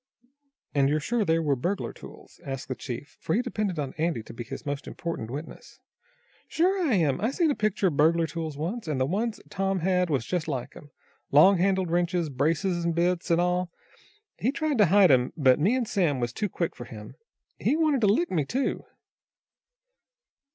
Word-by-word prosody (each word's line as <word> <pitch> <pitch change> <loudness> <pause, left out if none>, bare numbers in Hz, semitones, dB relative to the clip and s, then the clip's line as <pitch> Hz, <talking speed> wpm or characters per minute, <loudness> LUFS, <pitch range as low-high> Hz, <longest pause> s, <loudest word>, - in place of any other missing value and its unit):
"And 140 -2 +3
you're 150 +1 +1
sure 225 +8 0
they 165 -4 +2
were 150 -4 +1
burglar 180 +10 -2
tools?" - - -14
asked 135 -1 -6
the - - 0
chief, 130 +3 -8
for 160 - -1
he 240 - +1
depended 215 -7 -2
on 140 -3 -3
Andy 160 -8 0
to - - -11
be 120 - -6
his 115 - -8
most 145 0 -4
important 165 -10 -5
witness. 145 +6 -8 0.7
"Sure 365 +1 +1
I 250 - +3
am. 155 -7 +1
I 225 - +1
seen 315 +3 +1
a - - -1
picture 215 -1 0
of 145 - -6
burglar 165 +2 +4
tools 160 -1 -5
once, 180 +8 -4
and 150 -4 -1
the 130 - +2
ones 215 - -2
Tom 195 -1 -1
had 180 0 +1
was 135 -6 0
just 175 -3 -2
like 135 -6 -4
'em. 145 - -13 0.4
Long 175 +6 +6
handled 190 -2 +1
wrenches, 175 -1 0
brace 150 +8 0
an' 175 -2 0
bits, 175 +2 0
an' 170 0 +3
all. 180 0 +1 0.7
He 250 - +1
tried 300 -3 -1
to 210 - +6
hide 190 -1 +6
'em, 125 +1 +3
but 130 -3 +4
me 200 +11 +3
an' 255 -2 0
Sam 175 -11 0
was 120 -1 -2
too 210 - -2
quick 170 -1 -3
for 120 - -8
him. 105 -3 -10 0.5
He 300 - +1
wanted 305 -5 +2
to 210 - +4
lick 230 - +2
me, 160 -5 +1
too." 260 - -2
170 Hz, 200 wpm, -27 LUFS, 145-205 Hz, 0.7 s, Long